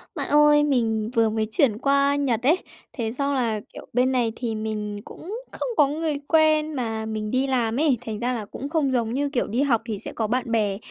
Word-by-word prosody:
Bạn - - -3
ơi, 295 0 +5
mình 225 -6 +1
vừa 230 -2 +3
mới 215 0 -1
chuyển 220 -1 +3
qua 280 +2 +2
Nhật 255 -6 0
ấy. 310 +8 +4 0.4
Thế 225 -4 -3
xong 280 +1 -1
là, 230 -5 0
kiểu, - - -10
bên 250 +2 +3
này 245 -3 +1
thì 230 -3 -3
mình 215 -1 -3
cũng 385 +6 -8 0.2
không - - -4
có 290 - +6
người 300 0 -2
quen 310 -1 +3
mà 225 -5 -3
mình 215 -1 -4
đi 260 +2 +1
làm 240 -2 0
ấy, 295 -5 +3
thành 215 -2 -4
ra 245 +2 -1
là 225 -4 -4
cũng 270 +7 -7
không 300 -4 +1
giống 230 -2 0
như 285 +2 0
kiểu 270 -4 -1
đi 235 +6 0
học 255 -6 +2
thì 215 -3 -3
sẽ - - -7
có 220 - -1
bạn 245 +1 -1
bè, 210 -4 +1
245 Hz, 230 wpm, -24 LUFS, 220-285 Hz, 0.4 s, có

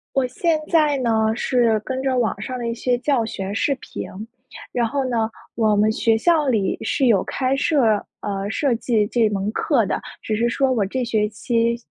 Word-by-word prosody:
我 265 -2 +2
现 320 +5 0
在 305 -4 +3
呢 240 -3 0 0.3
是 240 -3 +2
跟 260 0 -3
着 260 -2 0
网 220 -3 0
上 255 +2 -4
的 235 -1 -3
一 230 - -2
些 245 +1 0
教 255 -3 +1
学 195 -2 -5
视 275 +5 +1
频。 230 - -7 0.7
然 240 -1 +1
后 275 +2 -1
呢， 225 -2 0 0.2
我 215 -3 +2
们 215 +1 +3
学 225 +1 +2
校 315 -1 +2
里 210 -6 +1
是 270 - +1
有 200 -6 +4
开 260 0 -1
设， 260 -8 +2 0.2
呃， 200 -1 -3
设 265 +1 +1
计 225 -3 +1
这 225 -1 +2
门 200 0 -2
课 245 -9 +1
的， - - -2 0.2
只 215 - -2
是 235 +2 +1
说 265 +2 +1
我 220 -5 +1
这 250 +6 -2
学 215 -3 0
期 230 +2 0
235 Hz, 210 characters per minute, -21 LUFS, 215-260 Hz, 0.7 s, 有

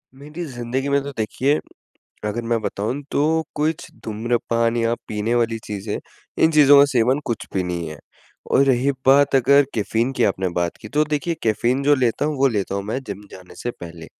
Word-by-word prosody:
मेरी 150 +5 -8
ज़िंदगी 130 0 -3
में 140 0 +2
तो 140 - -5
देखिए 130 +6 +1 0.7
अगर 120 +3 -3
मैं 115 -1 +2
बताऊँ 110 +7 -2
तो - - 0 0.3
कुछ 155 +1 -1 0.2
धूम्रपान 115 +1 0
या 115 0 +1
पीने 110 +2 -1
वाली 115 -1 +1
चीज़ें 105 0 -4 0.5
इन 160 - +5
चीज़ों 145 -2 +7
का 140 - +8
सेवन 125 +3 +3
कुछ 115 - -3
भी 95 - +1
नहीं 85 -2 -3
है। 75 -1 -8 0.5
और 140 - +5
रही 135 0 +2 0.2
बात 140 +1 +5
अगर 140 +2 +5
कैफ़ीन 115 +4 0
की 120 - +3
आपने 95 -2 0
बात 85 -1 -1
की 105 - -9
तो 150 +6 +2
देखिए 150 +3 -1
कैफ़ीन 120 +4 +1
जो 145 +1 +5
लेता 130 +1 0
हूँ 150 -1 -1
वो 135 0 +4
लेता 100 -4 -2
हूँ 100 - -2
मैं 110 +5 -2
जिम 100 +1 -6
जाने 90 -1 -13
से 120 - -1
पहले। 85 -6 -10
120 Hz, 195 wpm, -21 LUFS, 105-140 Hz, 0.7 s, का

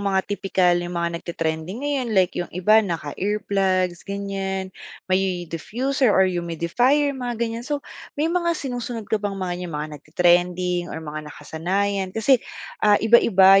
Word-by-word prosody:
mga 195 -1 +1
tipikal, 195 -3 +1
'yung 175 0 -5
mga 170 0 -1
nagte 170 - -7
trending 165 - -3
ngayon, 280 -4 -1
like 185 -2 +4
'yung 175 - -3
iba 215 +4 +5
naka-earplugs 185 +1 -1
ganiyan, 195 -1 -3 0.4
may 185 -2 +1
diffuser 245 - -1
or 190 -2 +5
humidifier, 185 - +1
mga 245 -3 -4
ganiyan. 230 +1 -3
So, 290 -1 -2 0.3
may 315 +3 0
mga 340 -2 +1
sinusunod 245 -4 -4
ka 215 - +2
bang 205 -1 -3
mga 185 -2 -2
'yung 170 -4 -6
mga 150 +1 -3
nagte-trending 175 +2 +2
or 160 0 -6
mga 150 0 -6
nakasanayan, 190 +4 -2
kasi, 240 +3 +4 0.4
ah, 210 -1 +5
iba-iba 195 -4 +6
195 Hz, 150 wpm, -23 LUFS, 175-225 Hz, 0.4 s, iba-iba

